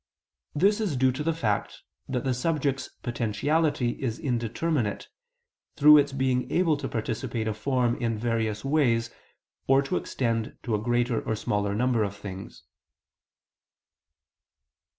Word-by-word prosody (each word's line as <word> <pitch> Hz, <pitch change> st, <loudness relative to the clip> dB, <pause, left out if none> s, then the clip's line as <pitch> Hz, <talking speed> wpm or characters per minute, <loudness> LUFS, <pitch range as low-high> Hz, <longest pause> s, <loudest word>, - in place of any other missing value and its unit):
This 205 Hz, +8 st, +3 dB
is 180 Hz, -11 st, -1 dB
due 130 Hz, 0 st, +3 dB
to 130 Hz, +4 st, -5 dB
the 165 Hz, +2 st, +1 dB
fact 110 Hz, -11 st, -2 dB, 0.3 s
that 125 Hz, -3 st, -1 dB
the 130 Hz, -, +1 dB
subject's 140 Hz, 0 st, -1 dB
potentiality 125 Hz, +4 st, 0 dB
is 120 Hz, -3 st, -2 dB
indeterminate, 120 Hz, -1 st, -1 dB, 0.7 s
through 150 Hz, +1 st, +8 dB
its 145 Hz, 0 st, +1 dB
being 130 Hz, -2 st, 0 dB
able 170 Hz, -3 st, +3 dB
to 140 Hz, -1 st, -4 dB
participate 115 Hz, 0 st, -3 dB
a 110 Hz, -, 0 dB
form 125 Hz, +1 st, 0 dB
in 115 Hz, -2 st, 0 dB
various 110 Hz, -1 st, -1 dB
ways, 125 Hz, -6 st, +2 dB, 0.6 s
or 135 Hz, +1 st, +5 dB
to 135 Hz, -, -1 dB
extend 115 Hz, -3 st, -2 dB
to 120 Hz, -, -2 dB
a 105 Hz, -, +1 dB
greater 120 Hz, 0 st, +1 dB
or -, -, -2 dB
a -, -, -3 dB
smaller 105 Hz, -1 st, -1 dB
number 120 Hz, 0 st, +1 dB
of 100 Hz, -1 st, -1 dB
things. 95 Hz, -1 st, -9 dB
125 Hz, 140 wpm, -27 LUFS, 115-140 Hz, 0.7 s, through